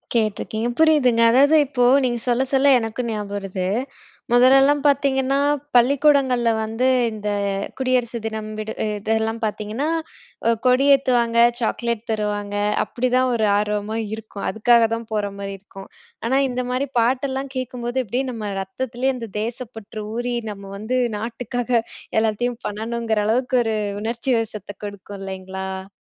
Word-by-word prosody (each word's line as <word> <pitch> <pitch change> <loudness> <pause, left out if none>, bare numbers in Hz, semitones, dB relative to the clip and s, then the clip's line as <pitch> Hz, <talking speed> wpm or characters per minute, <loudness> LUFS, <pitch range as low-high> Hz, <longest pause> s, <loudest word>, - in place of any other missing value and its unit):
கேட்டுருக்கேன். 220 +1 -1
புரியுதுங்க. 290 -7 +4
அதாவது, 280 +5 +5
இப்போ 255 -2 0 0.2
நீங்க 240 -2 0
சொல்ல, 245 +2 +2
சொல்ல 270 +1 +4
எனக்கும் 230 +1 -3
ஞாபகம் 205 -2 -4
வருது. 195 -2 -4 0.7
முதல்லலாம் 270 +4 +5
பார்த்தீங்கன்னா, 275 -1 +2 0.4
பள்ளிக்கூடங்கள்ல 260 -1 +4
வந்து, 225 +4 0 0.2
இந்த 210 -1 -4 0.5
குடியரசு 250 -2 0
தினம், 220 -1 -4
விடு 215 +1 -4 0.2
இதெல்லாம் 220 +2 -1
பார்த்தீங்கன்னா, 215 +6 -3 0.6
ஒ - - +5 0.2
கொடி 255 +2 +4
ஏத்துவாங்க, 240 -3 +1 0.2
சாக்லேட் 235 -1 -1
தருவாங்க, 205 -1 -2 0.3
அப்படிதான் 255 +1 +1
ஒரு 225 -2 +1
ஆர்வமா 210 +1 -1 0.2
இருக்கும். 220 -2 -7
அதுக்காக 230 +2 +4
தான் 230 0 -7
போற 205 -2 -1
மாரி 200 0 -4
இருக்கும். 195 0 -12 0.4
ஆனா, 265 +3 +3
இந்த 250 0 -2
மாரி 260 +3 -1
பாட்டெல்லாம் 265 +3 0
கேட்கும்போது, 250 0 -3
அப்டியே 245 +6 -1
நம்ம 215 -4 -5
ரத்தத்திலேயே, 250 +7 -2
அந்த 230 -2 -7
தேசப்பற்று 225 -2 -6
ஊறி, 245 +1 -2 0.2
நம்ம 200 -1 -10
வந்து, 220 +5 -2 0.2
நாட்டுக்காக 240 +2 -4 0.5
எல்லாத்தையும் 225 +2 -1
பண்ணணுங்கிற, 225 +1 -2
அளவுக்கு 250 +3 +1
ஒரு 220 -1 0 0.3
உணர்ச்சி 235 +4 -1
வசத்தை 210 -3 -6
கொடுக்கும். 200 0 -8
இல்லைங்களா?ஆ. 190 0 -7
230 Hz, 130 wpm, -22 LUFS, 215-255 Hz, 0.7 s, அதாவது